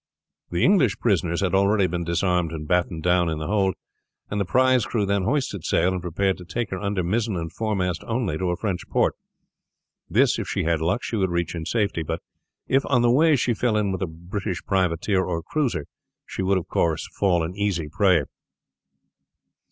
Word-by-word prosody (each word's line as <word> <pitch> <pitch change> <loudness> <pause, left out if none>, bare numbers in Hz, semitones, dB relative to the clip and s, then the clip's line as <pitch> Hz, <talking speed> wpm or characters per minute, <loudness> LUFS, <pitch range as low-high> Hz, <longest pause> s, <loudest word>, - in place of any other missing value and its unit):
The 85 - 0
English 160 - +4
prisoners 90 -5 +1
had 95 -2 0
already 100 +1 +3
been 90 -1 -2
disarmed 85 0 0
and 75 -2 -6
battened 85 -2 0
down 90 -1 +3
in 80 - -2
the 80 - -4
hold, 95 0 +1 0.6
and 105 0 0
the - - 0
prize 130 +3 +3
crew 105 0 -1
then 100 -1 0
hoisted 125 - -1
sail 90 +4 +2
and 90 - -3
prepared 95 +3 -1
to - - -9
take 100 +5 -4
her 95 - -3
under 100 -2 -1
mizzen 105 +4 0
and 80 -1 -5
foremast 95 -6 -1
only 115 -8 -1
to 90 - 0
a 90 - -1
French 95 -5 -3
port. - - +2 1.0
This, - - +3
if - - -4
she - - -1
had 80 -1 +1
luck, 90 +9 0
she 115 - -2
would 95 -2 +1
reach 85 -1 -1
in 85 -2 -5
safety, 105 -7 0
but 80 +1 -3 0.5
if 135 +1 +3
on 125 -4 +3
the 120 - +4
way 155 +4 +5
she 125 -2 +1
fell 110 -1 +1
in 105 -2 +1
with 95 - -3
a 95 - 0
British 90 +3 -5
privateer 95 +1 +1
or 85 -3 -3
cruiser 130 - -1 0.4
she - - -5
would 95 +1 +2
of 90 - -4
course 80 -2 0
fall 90 -4 +2
an 85 +3 -4
easy 100 -6 -1
prey. 90 -2 +3
95 Hz, 200 wpm, -24 LUFS, 85-105 Hz, 1.0 s, way